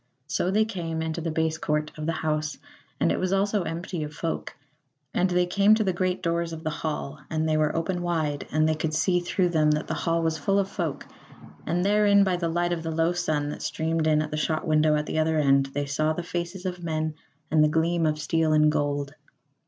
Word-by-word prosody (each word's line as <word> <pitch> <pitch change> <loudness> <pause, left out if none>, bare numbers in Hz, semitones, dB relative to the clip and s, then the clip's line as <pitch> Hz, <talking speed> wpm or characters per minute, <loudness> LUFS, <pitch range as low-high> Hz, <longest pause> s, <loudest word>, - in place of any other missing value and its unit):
So 170 +3 -1
they 215 +3 +3
came 165 -6 -3
into 160 +1 -3
the 165 - -2
base 160 0 0
court 150 0 -1
of 155 0 -5
the - - +2
house, 155 -1 -2 0.4
and - - +3
it - - 0
also 200 +2 +2
was 175 - -3
empty 170 +1 -4
of 150 0 -5
folk; 165 +1 -4 0.6
and 185 - +2
they 180 0 +2
came 200 +4 +4
to 220 - +1
the 190 -3 0
great 185 +1 -1
doors 170 -1 -1
of 160 0 -7
the 155 - -1
hall 150 -2 -4
and 160 0 0
they 155 - +2
were 155 0 +1
open 175 +2 -1
wide, 160 -5 -1
and 155 +1 +3
they 160 - +2
could 155 0 -2
see 180 +2 +2
through 175 +1 0
them 155 -3 +3
that 150 0 +1
the - - -3
hall 165 -1 0
was 160 -1 0
full 195 +7 +1
of 200 -1 +2
folk, 165 -7 -3 0.6
and 175 +2 0
therein 205 0 +5
by 190 -2 +1
the 170 -1 -1
light 175 +1 0
of 170 - -3
the 165 - -4
low 165 +2 +1
sun 155 -4 -1
that - - -6
streamed 160 0 -1
in 155 0 +3
at 155 - -7
the 150 - -2
shot 155 +2 -1
window 155 -1 +3
at 150 0 -1
the 160 - -2
other 160 0 +2
end 140 -2 +3
they 145 +1 -3
saw 155 +2 0
the 175 - -4
faces 175 +2 -4
of 180 -1 -4
men 155 -1 -1 0.4
and 155 -1 +5
the 150 - +4
gleam 165 +1 +1
of 155 0 0
steel 160 +1 +1
and 150 0 +5
gold. 145 -1 -1
160 Hz, 240 wpm, -26 LUFS, 155-175 Hz, 0.6 s, therein